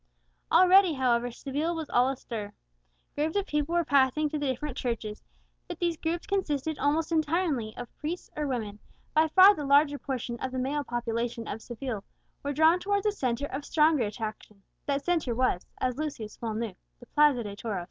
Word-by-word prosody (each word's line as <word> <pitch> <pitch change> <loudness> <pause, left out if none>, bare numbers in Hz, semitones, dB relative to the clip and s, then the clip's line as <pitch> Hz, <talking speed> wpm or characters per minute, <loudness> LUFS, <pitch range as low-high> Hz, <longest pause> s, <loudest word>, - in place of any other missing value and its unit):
Already, 370 -1 +6
however, 245 -3 +1
Seville 290 +7 -3
was 320 -2 -4
all 245 +2 +4
astir. 225 -6 -5 0.6
Groups 305 +2 -1
of 400 -1 +1
people 300 0 -1
were 345 -1 +2
passing 285 +2 +3
to 300 - -3
the 290 - -1
different 260 +1 -3
churches, 225 -4 -3 0.5
but 350 - -6
these 345 -1 0
groups 330 +2 -3
consisted 315 -6 -1
almost 310 +3 +1
entirely 310 -8 0
of 245 - -8
priests 325 +4 -5
or 300 -1 -2
women; 215 -6 -3 0.3
by 315 +1 +4
far 375 +5 +8
the 295 - -5
larger 285 +1 +4
portion 245 -3 -4
of 260 - -3
the 260 - -4
male 280 +3 -1
population 235 -2 -3
of 220 - -5
Seville 240 -3 -5 0.4
were 285 - -2
drawn 320 +4 +4
towards 405 +2 0
a 420 - +3
centre 260 - -1
of 285 +1 -5
stronger 305 -4 +3
attraction, 210 -1 -7 0.2
that 280 0 -1
centre 325 -9 0
was, 240 -7 0
as 255 -1 -1
Lucius 280 -8 -5
well 225 -2 -3
knew, 225 -2 -3 0.3
the 245 - -13
Plaza 295 -3 +3
de 205 -1 -6
Toros. 205 -2 -3
280 Hz, 185 wpm, -28 LUFS, 235-315 Hz, 0.6 s, far